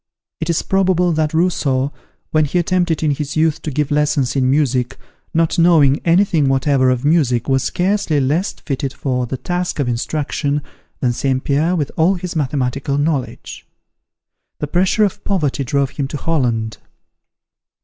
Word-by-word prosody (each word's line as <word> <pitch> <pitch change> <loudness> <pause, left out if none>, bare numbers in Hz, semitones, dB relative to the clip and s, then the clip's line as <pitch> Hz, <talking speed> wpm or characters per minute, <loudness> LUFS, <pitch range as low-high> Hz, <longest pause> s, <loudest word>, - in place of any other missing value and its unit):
It 160 0 -3
is 165 - +1
probable 185 -2 +2
that 155 -1 0
Rousseau, 145 -5 0 0.4
when 155 -1 +3
he 150 +5 -1
attempted 175 -2 +1
in 155 - +2
his 145 0 -3
youth 155 -1 +1
to - - -4
give 150 +1 -1
lessons 145 -3 +1
in 130 -2 +2
music, 130 -3 +1 0.3
not 165 +2 +1
knowing 155 -5 +4
any 175 +4 +4
thing 155 -8 +1
whatever 135 -1 +2
of 130 +1 0
music, 145 -7 +2
was 135 -1 +2
scarcely 185 -4 0
less 150 +9 0
fitted 135 -2 -4
for 125 -2 -2
the 130 - -4
task 180 +5 -3
of 140 -4 -1
instruction, 145 +3 -2 0.4
than 125 -2 +1
St. 130 +1 -1
Pierre 155 +6 +1
with 150 -5 -2
all 170 +5 +3
his 180 -1 -6
mathematical 140 -1 -1
knowledge. 145 -3 -3 0.9
The - - -3
pressure 185 +7 +2
of 200 - -1
poverty 150 -8 0
drove 140 +1 0
him 140 -1 -3
to 145 - -5
Holland. 120 -9 -1
150 Hz, 160 wpm, -18 LUFS, 135-165 Hz, 0.9 s, knowing